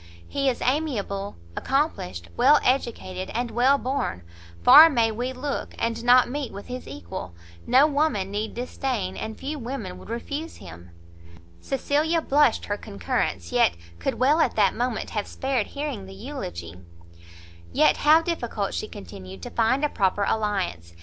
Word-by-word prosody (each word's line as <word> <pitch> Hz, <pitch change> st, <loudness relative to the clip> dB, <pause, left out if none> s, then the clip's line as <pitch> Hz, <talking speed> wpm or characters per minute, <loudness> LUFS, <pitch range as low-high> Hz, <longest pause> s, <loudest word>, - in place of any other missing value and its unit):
"He 275 Hz, -1 st, 0 dB
is 245 Hz, -, -2 dB
amiable, 230 Hz, -9 st, -1 dB, 0.2 s
accomplished, 90 Hz, -, -1 dB
well 295 Hz, -, +6 dB
educated, 205 Hz, -8 st, -1 dB
and 240 Hz, 0 st, -1 dB
well 255 Hz, +5 st, +4 dB
born; 255 Hz, -, -2 dB, 0.4 s
far 315 Hz, -, +10 dB
may 230 Hz, -6 st, +2 dB
we 245 Hz, +4 st, -3 dB
look, 270 Hz, +2 st, -4 dB
and 230 Hz, 0 st, -2 dB
not 245 Hz, +1 st, +6 dB
meet 275 Hz, +1 st, -4 dB
with 200 Hz, +1 st, -9 dB
his 250 Hz, 0 st, -7 dB
equal; 90 Hz, -1 st, -7 dB, 0.3 s
no 260 Hz, +4 st, +6 dB
woman 285 Hz, -10 st, 0 dB
need 210 Hz, +2 st, -3 dB
disdain, 240 Hz, -5 st, -3 dB
and 220 Hz, 0 st, -5 dB
few 290 Hz, +3 st, -5 dB
women 230 Hz, -7 st, -5 dB
would -, -, -13 dB
refuse 285 Hz, +7 st, -5 dB
him." 85 Hz, -2 st, -12 dB, 0.7 s
Cecilia 300 Hz, -, 0 dB
blushed 290 Hz, -5 st, +2 dB
her 205 Hz, -, -2 dB
concurrence; 90 Hz, -, -3 dB
yet 85 Hz, -, +3 dB, 0.2 s
could 85 Hz, -, -1 dB
well 285 Hz, +5 st, +3 dB
at -, -, +2 dB
that 200 Hz, -3 st, +3 dB
moment 245 Hz, -1 st, -2 dB
have 210 Hz, -2 st, -2 dB
spared 265 Hz, -5 st, -1 dB
hearing 280 Hz, -9 st, -5 dB
the 195 Hz, -, -10 dB
eulogy. 90 Hz, -, -7 dB, 0.9 s
"Yet -, -, +4 dB
how 310 Hz, +2 st, +5 dB
difficult," 240 Hz, -, -2 dB
she 215 Hz, -, -3 dB
continued, 95 Hz, -, -10 dB
"to -, -, -6 dB
find 255 Hz, +6 st, +2 dB
a -, -, 0 dB
proper 200 Hz, -2 st, +1 dB
alliance! 195 Hz, -, -2 dB
235 Hz, 155 wpm, -25 LUFS, 190-275 Hz, 0.9 s, far